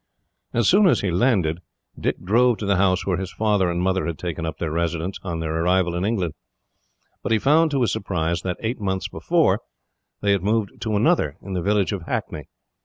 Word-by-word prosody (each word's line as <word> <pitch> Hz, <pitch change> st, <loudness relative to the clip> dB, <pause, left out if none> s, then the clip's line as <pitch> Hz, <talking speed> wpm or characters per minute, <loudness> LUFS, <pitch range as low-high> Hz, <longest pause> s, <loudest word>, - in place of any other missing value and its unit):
As 120 Hz, -3 st, +1 dB
soon 200 Hz, +1 st, +6 dB
as -, -, +3 dB
he 95 Hz, -, -1 dB
landed, 90 Hz, -5 st, +2 dB, 0.4 s
Dick -, -, -1 dB
drove 120 Hz, +5 st, +3 dB
to 105 Hz, -, -5 dB
the 100 Hz, -1 st, +2 dB
house 95 Hz, -1 st, +2 dB
where 90 Hz, -3 st, 0 dB
his 95 Hz, 0 st, -4 dB
father 105 Hz, -4 st, +1 dB
and 85 Hz, 0 st, -1 dB
mother 95 Hz, 0 st, +1 dB
had 85 Hz, -2 st, -3 dB
taken 85 Hz, -2 st, -4 dB
up 80 Hz, -, -5 dB
their 80 Hz, -2 st, -3 dB
residence, 85 Hz, +2 st, -2 dB
on 85 Hz, -3 st, -4 dB
their 80 Hz, -1 st, -2 dB
arrival 90 Hz, 0 st, +2 dB
in 90 Hz, +1 st, -2 dB
England; 95 Hz, -7 st, -1 dB, 0.9 s
but -, -, -3 dB
he 110 Hz, -, +5 dB
found 155 Hz, +8 st, +4 dB
to 140 Hz, -3 st, 0 dB
his 115 Hz, -7 st, +2 dB
surprise 85 Hz, -3 st, -1 dB
that, 90 Hz, -1 st, -3 dB
eight 115 Hz, +1 st, -3 dB
months 95 Hz, -2 st, -1 dB
before, -, -, +1 dB, 0.6 s
they 100 Hz, -, +2 dB
had 100 Hz, -2 st, +2 dB
moved 105 Hz, +1 st, -1 dB
to 110 Hz, -2 st, -1 dB
another, 160 Hz, +12 st, +2 dB
in 100 Hz, -, -6 dB
the 90 Hz, -, -1 dB
village 100 Hz, +2 st, +1 dB
of 100 Hz, -3 st, -3 dB
Hackney. 75 Hz, -3 st, -3 dB
95 Hz, 210 wpm, -23 LUFS, 85-110 Hz, 0.9 s, soon